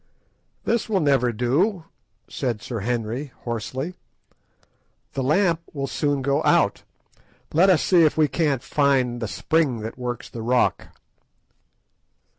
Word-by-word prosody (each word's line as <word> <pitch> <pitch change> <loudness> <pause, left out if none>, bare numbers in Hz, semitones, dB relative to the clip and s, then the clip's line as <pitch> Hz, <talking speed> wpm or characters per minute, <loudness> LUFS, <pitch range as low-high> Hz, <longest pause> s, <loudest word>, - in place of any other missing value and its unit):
"This 235 -1 0
will 200 -3 +2
never 135 -6 +2
do," 150 - 0 0.4
said 120 -5 -3
Sir 115 0 -5
Henry 120 +5 -3
hoarsely; 125 - -4 1.2
"the 135 - -2
lamp 165 +5 +2
will 140 -2 -2
soon 145 -1 -1
go 140 +3 +1
out. - - +3 0.7
Let 175 +5 +5
us 180 -4 +4
see 175 -3 +5
if 155 - +2
we 155 -1 +4
can't 145 -4 0
find 135 -4 +1
the 115 - -2
spring 140 0 0
that 110 +3 -7
works 125 -1 -4
the 115 - -8
rock." 125 +2 +1
135 Hz, 130 wpm, -23 LUFS, 120-160 Hz, 1.2 s, Let